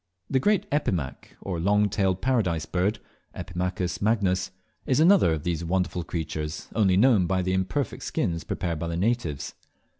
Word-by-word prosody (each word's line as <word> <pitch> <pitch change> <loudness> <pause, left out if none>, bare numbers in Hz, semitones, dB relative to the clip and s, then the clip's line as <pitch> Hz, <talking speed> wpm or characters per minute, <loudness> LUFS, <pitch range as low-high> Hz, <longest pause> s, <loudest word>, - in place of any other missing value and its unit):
The 130 - +3
great 205 +8 +2
Epimaque, 90 - -2
or 90 -4 -3
Long 105 +4 +3
tailed 95 -2 0
Paradise 105 -12 +1
Bird 95 +4 0 0.4
(Epimachus 90 0 -3
magnus), 100 -4 +1 0.4
is 130 - +2
another 170 - +6
of 75 -2 -3
these 85 -1 -2
wonderful 90 0 -1
creatures, 80 -2 -4
only 95 -4 +3
known 105 -5 +4
by 95 +1 +1
the 95 +1 0
imperfect 95 +8 -1
skins 85 -2 -2
prepared 85 -1 -3
by 85 - -3
the 85 0 -3
natives. 100 - -1
95 Hz, 155 wpm, -26 LUFS, 85-105 Hz, 0.4 s, another